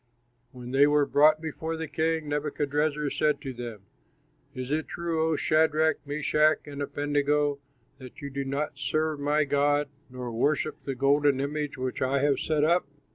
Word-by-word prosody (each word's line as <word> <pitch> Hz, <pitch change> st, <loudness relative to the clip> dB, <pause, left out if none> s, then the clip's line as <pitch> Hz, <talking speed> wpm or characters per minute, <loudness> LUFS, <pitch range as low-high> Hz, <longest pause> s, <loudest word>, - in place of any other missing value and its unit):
When 125 Hz, -1 st, -9 dB
they 140 Hz, +2 st, +5 dB
were 145 Hz, -1 st, +3 dB
brought 155 Hz, +2 st, +4 dB
before 160 Hz, 0 st, -4 dB
the 160 Hz, 0 st, -4 dB
king, 160 Hz, +1 st, -1 dB
Nebuchadrezzar 150 Hz, 0 st, -1 dB
said 150 Hz, -2 st, +1 dB
to 135 Hz, -, -5 dB
them, 120 Hz, -4 st, -7 dB, 0.7 s
"Is 130 Hz, +1 st, -5 dB
it 155 Hz, +1 st, -1 dB
true, 170 Hz, -2 st, -2 dB
O 160 Hz, -, +1 dB
Shadrach, 155 Hz, +1 st, +2 dB
Meshach, 150 Hz, +1 st, +2 dB
and 145 Hz, -1 st, -7 dB
Abednego, 145 Hz, 0 st, 0 dB, 0.4 s
that 130 Hz, -2 st, -11 dB
you 140 Hz, -1 st, -7 dB
do 140 Hz, +1 st, -3 dB
not 140 Hz, +1 st, -3 dB
serve 155 Hz, +1 st, -1 dB
my 145 Hz, +2 st, +2 dB
god 145 Hz, 0 st, +1 dB, 0.2 s
nor 125 Hz, -1 st, -6 dB
worship 145 Hz, +6 st, -1 dB
the 135 Hz, -, -3 dB
golden 140 Hz, +1 st, +3 dB
image 145 Hz, +1 st, -3 dB
which 130 Hz, 0 st, -4 dB
I 130 Hz, +2 st, +1 dB
have 140 Hz, 0 st, +2 dB
set 155 Hz, -2 st, 0 dB
up? 170 Hz, +2 st, +2 dB
145 Hz, 165 wpm, -27 LUFS, 140-155 Hz, 0.7 s, they